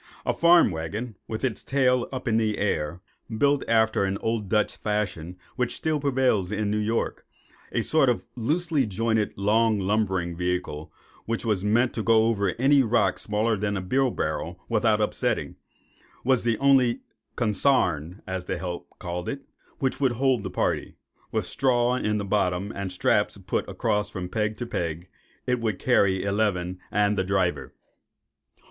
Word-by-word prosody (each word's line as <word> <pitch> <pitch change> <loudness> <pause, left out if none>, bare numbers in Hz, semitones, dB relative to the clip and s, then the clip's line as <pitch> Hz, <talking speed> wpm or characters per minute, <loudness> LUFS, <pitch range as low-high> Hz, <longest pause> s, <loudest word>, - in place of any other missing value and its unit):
A - - +1
farm 170 - +5
waggon, 100 +9 -4
with 110 +2 -5
its 120 -6 -2
tail 125 -3 +2
up 130 -2 -5
in 110 -1 +2
the 110 -2 +1
air, 85 -3 -1 0.4
built 140 +2 +3
after 110 -2 +3
an 95 0 -1
old 110 -3 -2
Dutch 105 -1 +1
fashion, 90 -5 -3 0.2
which 125 -2 -1
still 155 -2 -1
prevails 130 -9 +1
in 105 -1 -1
New 105 - 0
York,—a 110 +2 -4
sort - - +3
of - - 0
loosely 150 +2 0
jointed, 110 +1 0
long, 110 +2 +3
lumbering 95 -3 0
vehicle, 90 -3 -3 0.4
which 115 +1 -2
was 105 -4 0
meant 120 +4 +2
to 115 - -2
go 110 0 +4
over 100 -5 0
any 135 +3 +5
rock 120 -1 +2
smaller 110 +2 0
than 100 0 -1
a - - -3
beer 130 +8 +1
barrel 85 -2 -3
without 110 -1 +2
upsetting—was 125 +3 -3
the 115 -2 +1
only 135 -3 +3 0.3
"consarn," 105 - +1
as 95 -1 -4
the - - -2
"help" 90 -2 -5
called 90 0 -4
it, 140 -1 -5 0.3
which 130 -1 -1
would 130 -3 +3
hold 130 -1 +1
the 95 - -5
party. - - -1 0.4
With - - -1
straw 125 -2 +1
in 105 -4 0
the 100 - -3
bottom, 95 -1 0
and 100 -1 -4
straps 90 - +1
put - - -3
across 105 0 0
from 90 -1 -5
peg 105 +1 -1
to 120 - -4
peg, 85 -5 -4 0.4
it 125 -1 +1
would 110 -4 -1
carry 100 -7 +2
eleven, 100 -3 0
and 105 0 +2
the - - +2
driver. 90 -8 -1
105 Hz, 160 wpm, -25 LUFS, 95-120 Hz, 0.4 s, farm